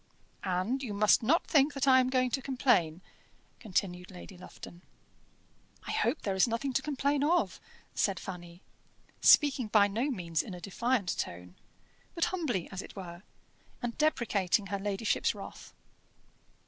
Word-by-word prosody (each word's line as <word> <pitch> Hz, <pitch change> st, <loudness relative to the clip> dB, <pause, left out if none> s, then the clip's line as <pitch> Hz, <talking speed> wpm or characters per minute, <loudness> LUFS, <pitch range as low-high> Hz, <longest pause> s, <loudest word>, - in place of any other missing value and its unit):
"And 185 Hz, +9 st, 0 dB
you 220 Hz, -6 st, -4 dB
must 210 Hz, +1 st, +4 dB
not 300 Hz, +10 st, +2 dB
think 290 Hz, -1 st, +3 dB
that 275 Hz, 0 st, -1 dB
I 260 Hz, -1 st, +7 dB
am 255 Hz, 0 st, +2 dB
going 255 Hz, -1 st, +1 dB
to 270 Hz, -, -1 dB
complain," 245 Hz, -, +1 dB, 0.6 s
continued 180 Hz, -4 st, -2 dB
Lady 185 Hz, +1 st, -11 dB
Lufton. 175 Hz, -1 st, -12 dB, 1.0 s
"I -, -, -4 dB
hope 315 Hz, -, 0 dB
there 195 Hz, -, -1 dB
is 190 Hz, +5 st, +3 dB
nothing 240 Hz, +4 st, -2 dB
to -, -, +1 dB
complain 285 Hz, -1 st, 0 dB
of," 340 Hz, +4 st, +1 dB, 0.3 s
said 195 Hz, -4 st, 0 dB
Fanny, 175 Hz, -1 st, -9 dB, 0.6 s
speaking 280 Hz, -5 st, +5 dB
by 210 Hz, -1 st, +5 dB
no 230 Hz, +8 st, -1 dB
means 170 Hz, -, -1 dB
in 190 Hz, -, -8 dB
a -, -, -9 dB
defiant 200 Hz, +2 st, -1 dB
tone, 90 Hz, +1 st, -5 dB, 0.6 s
but 335 Hz, -, +2 dB
humbly 260 Hz, -, -1 dB
as 190 Hz, -1 st, -5 dB
it -, -, -12 dB
were, 175 Hz, -3 st, -8 dB, 0.6 s
and 240 Hz, -2 st, -4 dB
deprecating 215 Hz, -, +1 dB
her 200 Hz, -, -1 dB
ladyship's 205 Hz, +2 st, 0 dB
wrath. -, -, -10 dB
215 Hz, 150 wpm, -30 LUFS, 185-265 Hz, 1.0 s, I